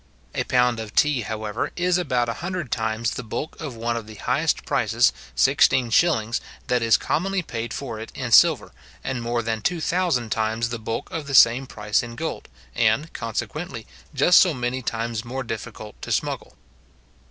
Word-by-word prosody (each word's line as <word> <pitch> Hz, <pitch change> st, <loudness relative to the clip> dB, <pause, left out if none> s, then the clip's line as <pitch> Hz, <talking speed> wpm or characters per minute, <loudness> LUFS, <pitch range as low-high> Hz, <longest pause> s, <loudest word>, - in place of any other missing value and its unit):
A -, -, -1 dB
pound 125 Hz, -2 st, +2 dB
of 110 Hz, -2 st, -7 dB
tea, 150 Hz, -4 st, +3 dB
however, 110 Hz, 0 st, -3 dB
is 180 Hz, 0 st, +2 dB
about 125 Hz, -8 st, 0 dB
a 115 Hz, -, -1 dB
hundred 175 Hz, -6 st, -4 dB
times 110 Hz, 0 st, -1 dB
the -, -, -4 dB
bulk 145 Hz, +9 st, -5 dB
of 145 Hz, -6 st, -5 dB
one 115 Hz, +1 st, -2 dB
of 115 Hz, -2 st, -5 dB
the 110 Hz, -, -10 dB
highest -, -, 0 dB
prices, -, -, +2 dB, 0.2 s
sixteen 120 Hz, -, +4 dB
shillings, 115 Hz, -6 st, +2 dB, 0.2 s
that 125 Hz, -1 st, +1 dB
is 115 Hz, -1 st, +4 dB
commonly 190 Hz, +3 st, -1 dB
paid 115 Hz, -5 st, -5 dB
for 120 Hz, -6 st, -5 dB
it 110 Hz, -, -8 dB
in 125 Hz, -3 st, -4 dB
silver, -, -, +5 dB, 0.3 s
and 130 Hz, -2 st, -3 dB
more 120 Hz, 0 st, -1 dB
than 110 Hz, -1 st, -2 dB
two 175 Hz, +7 st, 0 dB
thousand 160 Hz, -10 st, 0 dB
times 110 Hz, +1 st, 0 dB
the 120 Hz, -1 st, -4 dB
bulk 115 Hz, +1 st, -4 dB
of 155 Hz, -3 st, -4 dB
the 140 Hz, -, -1 dB
same 125 Hz, +2 st, +6 dB
price 105 Hz, -3 st, 0 dB
in 115 Hz, -1 st, -8 dB
gold, -, -, -5 dB, 0.2 s
and, 155 Hz, -, +1 dB
consequently, 115 Hz, +2 st, -4 dB, 0.3 s
just 160 Hz, +5 st, +6 dB
so 175 Hz, -5 st, +4 dB
many 125 Hz, +1 st, -2 dB
times 115 Hz, -1 st, -3 dB
more 130 Hz, +2 st, -4 dB
difficult 110 Hz, -2 st, -7 dB
to -, -, -6 dB
smuggle. -, -, -2 dB
120 Hz, 180 wpm, -24 LUFS, 115-140 Hz, 0.3 s, same